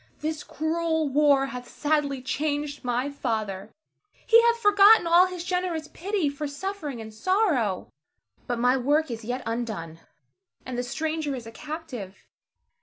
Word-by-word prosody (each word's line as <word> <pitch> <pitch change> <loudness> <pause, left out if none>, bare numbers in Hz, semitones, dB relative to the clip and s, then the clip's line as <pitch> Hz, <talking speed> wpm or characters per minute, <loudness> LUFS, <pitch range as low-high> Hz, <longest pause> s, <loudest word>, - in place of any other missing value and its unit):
This 310 0 -3
cruel 320 0 -1
war 280 -1 +4
hath 250 -2 -7
sadly 290 -3 -1
changed 290 +1 -2
my 245 +2 0
father; 215 -8 -3 0.6
he 460 +1 +7
hath 470 0 +3
forgotten 415 -1 +6
all 345 +2 +6
his 365 -2 -6
generous 360 -3 -2
pity 385 -2 -1
for 285 +1 -3
suffering 295 -3 -5
and 220 -1 -8
sorrow. 255 - +1 0.6
But 245 - -1
my 250 +2 +3
work 290 +3 +1
is 230 0 -5
yet 250 +3 -3
undone, 215 -9 -4 0.7
and 255 - -5
the 245 - 0
stranger 310 +3 -2
is 245 -3 -7
a 225 - -9
captive. 285 - -8
290 Hz, 145 wpm, -26 LUFS, 245-325 Hz, 0.7 s, he